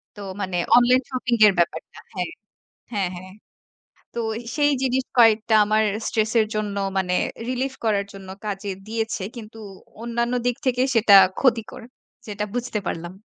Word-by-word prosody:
তো 205 - -10 0.2
মানে 185 -2 -2 0.2
online 250 +1 +5
shopping 250 -2 -1
এর 200 - +4
ব্যাপারটা 170 - -2 0.2
হ্যাঁ, 180 -2 -3 0.6
হ্যাঁ, 195 -4 -1
হ্যাঁ। 185 +1 -10 0.8
তো - - -5 0.4
সেই 290 0 +3
জিনিস 260 0 +1
কয়েকটা 225 -1 +5
আমার 215 +1 +2 0.2
stress 220 -1 0
এর 215 - +2
জন্য 210 -1 -2 0.2
মানে 180 -1 0 0.3
relief 260 +1 -2
করার 205 -2 +1
জন্য 195 -1 -11 0.2
কাজে 200 -1 -4 0.2
দিয়েছে। 225 -2 -3
কিন্তু 225 0 -10 0.4
অন্যান্য 235 +1 -1
দিক 245 - +1
থেকে 250 0 +2
সেটা 215 -3 +5 0.3
ক্ষতিকর। 245 -1 0 0.4
সেটা 210 0 -4
বুঝতে 245 -3 -2
পারলাম। 175 +1 -4
220 Hz, 145 wpm, -23 LUFS, 200-245 Hz, 0.8 s, online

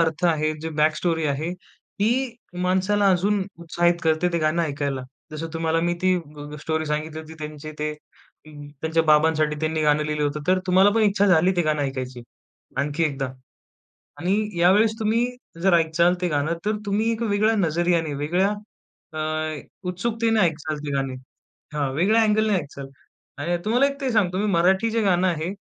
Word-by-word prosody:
अर्थ 165 +1 0
आहे, 155 -2 +1
जी 160 - -4
बॅकस्टोरी 160 +1 +1
आहे, 150 +4 -2
ती 240 +7 -3 0.3
माणसाला 190 +2 +2
अजून 200 +3 +1 0.2
उत्साहित 175 +1 +1
करते, 160 +2 +2
ते 170 - +1
गाणं 155 +2 +1
ऐकायला. 140 -3 -2 0.3
जसं 155 +2 -5
तुम्हाला 165 0 0
मी 175 - +1
ती 185 0 +4
ग 150 -2 -10
ग - - -6
स्टोरी 160 0 -2
सांगितली 155 +1 -3
होती 160 0 -11
त्यांचे 155 0 -7
ते 150 0 -1
अ, 150 0 -20 0.3
त्यांच्या 160 +1 +2
बाबांसाठी 155 0 +3
त्यांनी 155 0 0
गाणं 150 0 +3
लिहिलं 150 0 -2
होतं. 145 +1 -2
तर 185 0 +4
तुम्हाला 190 +2 +5
पण 225 - +3
इच्छा 205 -1 +3
झाली 180 0 +4
ते 175 - +3
गाणं 155 -2 0
ऐकायची, 130 -2 -4 0.6
आणखी 145 +3 0
एकदा. 135 -3 -2 0.9
आणि 180 +4 0 0.3
यावेळेस 205 +5 +5
तुम्ही 225 +2 +2 0.4
जर 190 0 +4
ऐकालं 170 +1 +3
ते 180 - +1
गाणं, 150 +1 0
तर 215 0 0
तुम्ही 210 +3 +1
एक 225 0 -3
वेगळ्या 215 +1 +2
नजरियाने, 170 -4 +1
वेगळ्या 175 +8 +1 0.6
अ, 155 - -5 0.7
उत्सुकतेने 225 +4 0
ऐकालं 155 -4 0
ते 145 - -3
गाणे. 135 -1 -1 0.6
हां, 145 -2 0
वेगळ्या 205 +9 +3
अँगलने 215 0 +2
ऐकालं 140 -5 -4 0.5
आणि 175 +3 0
तुम्हाला 245 +6 +3
एक 280 0 -4
ते 270 -2 -1
सांगतो, 185 -4 +1
मी 210 - 0
मराठी 190 +6 +3
जे 225 0 0
गाणं 185 -2 +2
आहे, 165 -1 -2
170 Hz, 170 wpm, -23 LUFS, 155-195 Hz, 0.9 s, तुम्हाला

